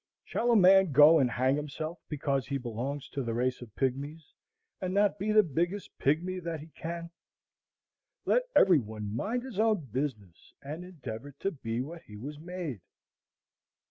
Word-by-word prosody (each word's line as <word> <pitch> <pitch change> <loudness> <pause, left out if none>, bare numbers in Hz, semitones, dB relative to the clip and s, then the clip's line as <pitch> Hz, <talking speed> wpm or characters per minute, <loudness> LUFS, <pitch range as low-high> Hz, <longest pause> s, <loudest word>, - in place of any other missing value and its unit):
Shall 240 - -1
a 235 - +5
man 190 -4 +6
go 150 +4 +8
and 130 -3 +3
hang 130 +3 +2
himself 155 +3 -4
because 140 -3 -1
he 140 0 -1
belongs 130 +3 -4
to 140 - -3
the 115 -3 -2
race 125 +1 0
of 115 -4 -11
pygmies, 140 +4 -3 0.5
and 185 0 -2
not 205 0 +3
be 210 +3 0
the 215 0 +6
biggest 175 +5 -2
pygmy 175 +6 +1
that 165 -2 -3
he 155 +3 -11
can? 170 +1 -6 1.1
Let - - +2
every 180 -5 +7
one 105 -2 -6
mind 230 - -1
his 250 -6 -6
own 215 - +2
business, 110 - -4
and 155 +5 -6
endeavor 145 -7 -8
to 195 - 0
be 115 -6 -3
what 165 +5 -7
he 105 - -12
was 145 +7 -7
made. 165 - -5
150 Hz, 170 wpm, -30 LUFS, 130-180 Hz, 1.1 s, go